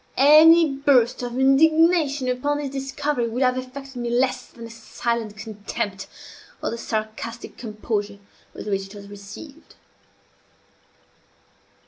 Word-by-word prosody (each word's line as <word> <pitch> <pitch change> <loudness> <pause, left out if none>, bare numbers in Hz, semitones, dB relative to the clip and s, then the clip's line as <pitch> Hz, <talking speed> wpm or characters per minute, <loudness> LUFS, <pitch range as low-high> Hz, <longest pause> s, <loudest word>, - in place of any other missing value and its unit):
Any 310 +1 +7
burst 255 -4 +3
of 245 0 -5
indignation 295 +1 +3
upon 255 +4 0
this 290 -2 -4
discovery 275 -1 -2
would 240 +4 -1
have 255 0 +2
affected 260 +1 -7
me 240 -1 -3
less 255 +2 0
than 235 - -13
the 230 - -9
silent 230 -1 -4
contempt, 205 -2 -5 0.6
or - - -1
the 235 - -4
sarcastic 220 +2 -5
composure, 210 -2 -4 0.4
with - - -8
which 195 -1 -2
it 195 - -14
was 200 -1 -10
received. 205 +10 -12
250 Hz, 125 wpm, -23 LUFS, 220-275 Hz, 0.6 s, Any